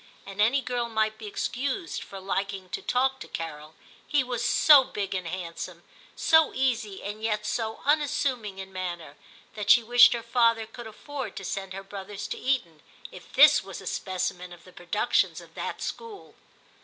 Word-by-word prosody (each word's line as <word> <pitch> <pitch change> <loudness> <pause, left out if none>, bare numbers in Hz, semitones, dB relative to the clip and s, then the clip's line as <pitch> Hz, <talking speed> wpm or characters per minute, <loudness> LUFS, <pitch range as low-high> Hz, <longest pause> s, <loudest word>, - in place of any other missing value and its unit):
And 195 +1 -4
any 245 +6 +4
girl 240 -1 -2
might 220 -1 0
be 215 - -7
excused 275 - -3
for 195 - -9
liking 195 0 -3
to - - -4
talk 265 +1 +1
to - - -9
Carol; 155 -1 -7 0.3
he 290 -2 +2
was 245 -2 -3
so 275 +3 +7
big 200 -6 -4
and 185 -2 -3
handsome, 170 -1 -6 0.3
so 320 -1 +4
easy 235 -7 -1
and 210 +1 -6
yet 210 -1 -1
so 220 +1 -3
unassuming 270 -8 0
in 190 0 -8
manner, 175 -5 -5 0.4
that 210 -1 -5
she 235 - +7
wished 240 +2 +7
her 235 -1 -4
father 230 -1 +2
could 225 +1 -10
afford 275 +5 -7
to 195 - -7
send 195 0 -4
her 195 +1 -7
brothers 195 +1 -7
to - - -4
Eton, 205 - -1 0.3
if - - -13
this - - +7
was - - -8
a - - -11
specimen 180 -1 -3
of 175 -1 -13
the 185 - -16
productions 175 +7 0
of - - -15
that - - -5
school. 450 -3 -7
215 Hz, 180 wpm, -27 LUFS, 190-245 Hz, 0.4 s, so